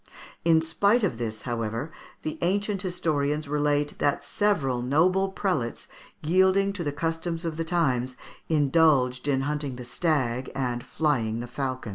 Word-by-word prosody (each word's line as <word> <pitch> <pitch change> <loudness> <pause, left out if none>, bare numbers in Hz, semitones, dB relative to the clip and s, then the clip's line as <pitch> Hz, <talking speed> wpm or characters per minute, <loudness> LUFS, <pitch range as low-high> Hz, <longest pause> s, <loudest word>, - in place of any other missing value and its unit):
In 160 -1 +4
spite 200 +8 +2
of 145 - 0
this, 110 -2 -4
however, 115 +4 -3 0.3
the 155 - -4
ancient 200 +2 0
historians 155 -5 -1
relate 145 0 0
that 145 - +1
several 150 - 0
noble 180 +9 +2
prelates, 165 - -2 0.4
yielding 190 +4 +3
to 190 -4 -4
the 145 - -1
customs 165 +3 -2
of 165 -2 -2
the 165 - -2
times, 130 -7 0 0.3
indulged 145 -4 +3
in 135 -2 +2
hunting 145 -1 -2
the 125 0 -8
stag 130 -2 -1
and 125 -3 -2
flying 120 -8 0
the 120 - -4
falcon. 130 -1 -4
150 Hz, 145 wpm, -26 LUFS, 125-170 Hz, 0.4 s, In